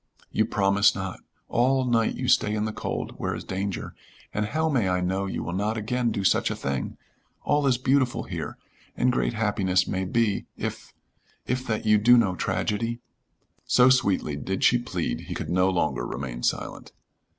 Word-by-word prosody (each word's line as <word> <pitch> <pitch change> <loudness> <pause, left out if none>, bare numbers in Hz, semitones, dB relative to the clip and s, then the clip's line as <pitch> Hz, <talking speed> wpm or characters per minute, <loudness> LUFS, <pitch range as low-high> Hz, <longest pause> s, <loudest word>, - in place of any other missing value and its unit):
"You - - +2
promise 100 +1 +3
not? 95 -2 -5 0.3
All 130 +2 +2
night 115 -2 +2
you - - -3
stay 105 0 +3
in 105 0 0
the 110 - -3
cold, - - -4
where - - -2
is - - -6
danger, 95 +1 -4 0.4
and 105 0 -1
how 160 +7 0
may 125 -11 +1
I 90 0 +1
know 95 +2 -1
you - - -3
will 85 - -4
not 105 +4 -1
again 120 +3 0
do 100 - -2
such 95 - +3
a - - -2
thing? 70 -1 -3 0.5
All 145 -1 +2
is 125 -2 +3
beautiful 130 0 +1
here, - - -5 0.4
and 125 - +3
great 120 - 0
happiness 100 -4 +1
may 95 0 -1
be 110 +1 0
if - - -5 0.5
if 130 +1 -2
that 110 -1 -2
you 105 -1 +5
do 120 +4 +6
no 105 -6 +3
tragedy." 115 +5 -1 0.7
So 125 +1 +5
sweetly 95 - +1
did 95 +6 -3
she 120 - +5
plead 90 - -3
he - - -3
could - - -4
no 90 +1 +3
longer 75 -9 0
remain - - -5
silent. - - -3
105 Hz, 185 wpm, -26 LUFS, 95-120 Hz, 0.7 s, do